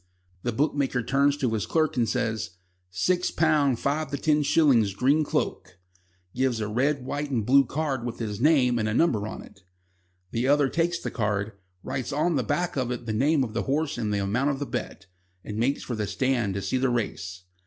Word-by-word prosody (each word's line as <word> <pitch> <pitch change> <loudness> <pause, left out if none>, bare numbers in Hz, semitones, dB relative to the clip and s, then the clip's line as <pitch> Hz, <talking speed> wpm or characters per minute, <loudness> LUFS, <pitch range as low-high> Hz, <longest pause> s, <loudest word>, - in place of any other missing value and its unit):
The 120 - -1
bookmaker 135 -1 0
turns 140 +4 +2
to 125 -5 0
his 105 -5 -1
clerk 155 -2 +1
and 120 -4 +1
says: 110 -7 -2 0.3
"Six 175 - +1
pound 150 -5 +2
five 145 +4 -1
to 140 - -3
ten 150 +1 +2
shillings 130 -10 +3
Green 140 +7 +3
Cloak," 90 - -3 0.6
gives 130 -2 0
a 105 - -2
red 130 +5 0
white 145 +2 -3
and 120 -6 -1
blue 135 +3 +5
card 140 -2 -2
with 120 -1 -4
his 110 -2 -4
name 130 -5 +4
and 110 0 0
a 110 - -1
number 110 -9 +2
on - - -7
it; - - -17 0.7
the 120 +3 0
other 145 -1 +4
takes 170 +2 0
the - - -5
card, 105 -2 -1 0.3
writes 130 -1 -3
on 155 +4 +1
the 135 - +2
back 175 +9 -1
of 130 -2 0
it 120 -1 -4
the 110 - -2
name 140 +5 +2
of 115 -4 -5
the 115 - 0
horse 155 +2 0
and 110 -3 -1
the 100 -1 0
amount 120 +9 +1
of 140 - -1
the 145 - -3
bet, 100 - -5 0.4
and 105 - -6
makes 130 +5 0
for 125 - -4
the 105 -2 -2
stand 120 -7 0
to 100 - -3
see 130 - 0
the 130 0 +2
race. 95 -6 -3
130 Hz, 210 wpm, -26 LUFS, 110-145 Hz, 0.7 s, blue